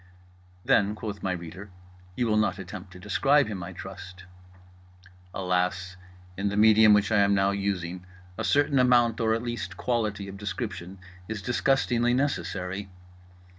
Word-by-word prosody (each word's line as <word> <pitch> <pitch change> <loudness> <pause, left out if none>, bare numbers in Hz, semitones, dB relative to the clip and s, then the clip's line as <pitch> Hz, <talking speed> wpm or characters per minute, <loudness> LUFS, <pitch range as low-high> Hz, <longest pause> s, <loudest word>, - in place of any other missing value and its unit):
Then 105 +1 +3
(quoth 105 -2 -6
my 95 - -1
reader) 90 +3 -7 0.5
you 125 - 0
will 110 -2 +1
not 110 -2 +1
attempt 95 0 -9
to - - -11
describe 135 +9 +3
him, 105 -4 -5
I 85 +1 -6
trust.—Alas, 90 0 -6 0.4
in 100 +2 -1
the 100 - -3
medium 110 0 +6
which 105 +1 +1
I 105 - +4
am 100 0 +4
now 95 0 +2
using 95 -3 -3 0.3
a - - -4
certain 145 -1 +2
amount 120 -2 +4
or 110 0 +2
at 115 - -4
least 120 -6 -5
quality 105 -5 -1
of 100 0 -8
description 95 -2 -5 0.3
is 110 -2 -5
disgustingly 120 -1 +1
necessary. 95 - -2
100 Hz, 145 wpm, -27 LUFS, 90-110 Hz, 0.5 s, medium